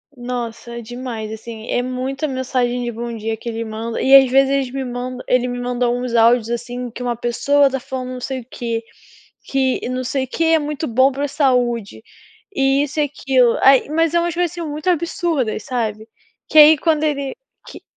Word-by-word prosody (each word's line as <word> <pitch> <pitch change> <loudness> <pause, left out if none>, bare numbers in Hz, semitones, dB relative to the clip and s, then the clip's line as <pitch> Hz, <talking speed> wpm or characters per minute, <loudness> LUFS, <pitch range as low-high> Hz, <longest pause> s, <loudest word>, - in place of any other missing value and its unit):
Nossa 240 -1 -5
demais, 235 -2 -6
assim, 220 0 -8
é 245 - +1
muita 260 +3 -3
mensagem 255 -2 -1
de 240 - -3
bom 235 +1 -5
dia 225 0 -3
que 235 - -6
ele 230 0 -3
manda 225 +1 -4
e, 270 +1 +6
às 265 -2 +8
vezes, 270 0 +4
eles 275 -2 0
me 270 0 -3
mandam 250 +1 -5
ele 250 0 +2
me 245 0 -4
mandou 245 0 0
uns 245 -1 -3
áudios, 230 0 +4
assim, 240 +1 -4
que 240 +2 -8
uma 240 -1 -1
pessoa 275 +4 +2
tá 270 - -3
falando 255 0 -6
não 250 - -7
sei 265 0 -3
o 230 - -16
quê. 230 -1 -4 0.6
Que 265 -2 -1
não 255 0 -2
sei 260 +1 -1
o - - -20
que 330 +6 -2
é 325 0 +4
muito 300 +1 -3
bom 260 +3 +4
para 280 +2 -4
a - - -2
saúde, 245 - 0 0.5
e 270 0 +3
isso 295 +2 -4
e - - +4
aquilo. 265 -4 +2
aí, 270 0 +6
mas 325 +1 +1
é 340 - +4
umas 340 -1 -1
coisas, 350 -1 0
assim, 350 -1 -7
muito 300 +4 -2
absurdas, 335 - -1
sabe, 220 -4 -3 0.4
que 310 - 0
aí, 305 +1 +9
quando 310 0 +1
ele 280 0 -1 0.3
que - - -11
255 Hz, 205 wpm, -19 LUFS, 240-275 Hz, 0.6 s, aí